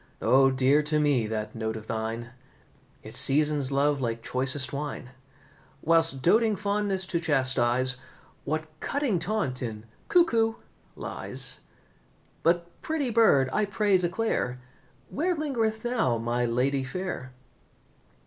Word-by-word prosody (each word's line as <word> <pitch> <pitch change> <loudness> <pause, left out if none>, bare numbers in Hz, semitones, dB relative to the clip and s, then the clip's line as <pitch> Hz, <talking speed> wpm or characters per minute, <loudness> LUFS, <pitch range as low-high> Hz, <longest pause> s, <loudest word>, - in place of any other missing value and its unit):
O, 135 +1 +5
dear 135 +3 +3
to 150 +1 -1
me 140 -7 +2
that 110 -1 -4
note 110 -1 -3
of 110 -1 -8
thine, 115 +2 -4 0.7
It 110 - -9
seasons 145 +1 +3
love 140 0 +1
like 115 -2 -3
choicest 130 +1 +1
wine; 140 -3 -5 0.7
Whilst, 165 -4 +3
doating 220 +4 +4
fondness 200 -1 -1
to 175 -2 -1
chastise, 130 -4 +2 0.5
What 155 +2 -2
cutting 275 -10 -1
taunt 170 -8 -2
in 110 -3 -5 0.2
'Cuckoo' 230 -11 +3 0.4
lies! - - -3 0.8
But, 170 +1 0
pretty 295 -6 -2
bird, 215 - +4
I 215 - +2
pray 205 -2 +2
declare 175 - -1 0.5
Where 350 +5 0
lingereth 235 -8 -2
now 230 - +1
my 120 +2 -1
lady 130 +3 0
fair?" 150 -3 -5
145 Hz, 120 wpm, -27 LUFS, 125-205 Hz, 0.8 s, O